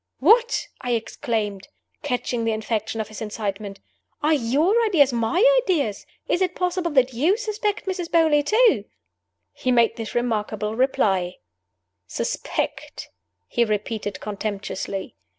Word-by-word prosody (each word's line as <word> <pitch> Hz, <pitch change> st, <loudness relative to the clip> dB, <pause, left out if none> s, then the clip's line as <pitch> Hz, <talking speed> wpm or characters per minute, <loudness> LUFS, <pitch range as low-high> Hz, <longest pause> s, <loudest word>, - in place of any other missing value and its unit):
"What!" 460 Hz, -, +4 dB, 0.2 s
I 245 Hz, -1 st, -1 dB
exclaimed, 220 Hz, -4 st, -2 dB, 0.3 s
catching 250 Hz, -4 st, -2 dB
the 225 Hz, 0 st, +1 dB
infection 220 Hz, 0 st, -2 dB
of 215 Hz, -1 st, -3 dB
his 215 Hz, -, -9 dB
excitement. 205 Hz, -2 st, -4 dB, 0.4 s
"Are 310 Hz, +2 st, +4 dB
your 305 Hz, -, +2 dB
ideas 290 Hz, -, +4 dB
my 240 Hz, -, +2 dB, 0.2 s
ideas? 295 Hz, -, -1 dB, 0.2 s
Is 350 Hz, -, +1 dB
it 365 Hz, -1 st, +1 dB
possible 360 Hz, -1 st, -1 dB
that 260 Hz, -2 st, +3 dB
you 315 Hz, -, +2 dB
suspect 430 Hz, -3 st, -2 dB
Mrs. 365 Hz, -3 st, -3 dB
Beauly 320 Hz, -3 st, +4 dB
too?" 430 Hz, -, +3 dB, 0.7 s
He 255 Hz, -, -1 dB
made 235 Hz, -2 st, +3 dB
this 225 Hz, -2 st, -6 dB
remarkable 220 Hz, -2 st, -1 dB
reply: 195 Hz, -8 st, +1 dB, 0.7 s
"Suspect?" -, -, -3 dB, 0.4 s
he 240 Hz, -, +2 dB
repeated, 210 Hz, -1 st, -2 dB
contemptuously. 200 Hz, -2 st, -4 dB
240 Hz, 125 wpm, -23 LUFS, 215-340 Hz, 0.7 s, What